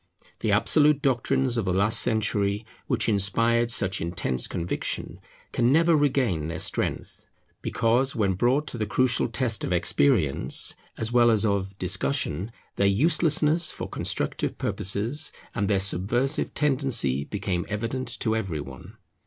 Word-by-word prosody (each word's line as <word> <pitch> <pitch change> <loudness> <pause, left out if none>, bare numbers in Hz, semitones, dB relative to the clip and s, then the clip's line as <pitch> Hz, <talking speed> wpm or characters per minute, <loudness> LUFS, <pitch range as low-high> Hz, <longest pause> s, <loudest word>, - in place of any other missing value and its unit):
The - - 0
absolute 150 -1 +3
doctrines 130 -1 +1
of 115 - 0
the 90 - 0
last 100 +4 +2
century 105 -1 0 0.2
which - - 0
inspired 115 +3 +2
such 95 -4 -1
intense 85 -7 -2
conviction, 85 0 -4 0.3
can 120 +1 +2
never 165 +3 +4
regain 130 - +1
their 80 -1 -4
strength, - - -4 0.4
because, 125 +4 +1
when 100 -5 +1
brought 125 +10 +1
to 120 - -6
the 110 - -1
crucial 125 +4 +2
test 115 -3 -1
of - - -2
experience 90 - +2 0.2
as 115 +1 -3
well 120 -1 +5
as 110 -1 +2
of 100 -2 -1
discussion, 95 - -2 0.3
their 100 - +3
uselessness 155 - +2
for - - -6
constructive - - -2
purposes 115 +11 -1 0.2
and 100 - -1
their 100 -2 +2
subversive 110 - 0
tendency 130 - +1
became 95 -2 -3
evident 115 +5 -3
to 110 -1 +1
every 95 -9 -2
one. 70 -2 -10
110 Hz, 140 wpm, -25 LUFS, 95-130 Hz, 0.4 s, well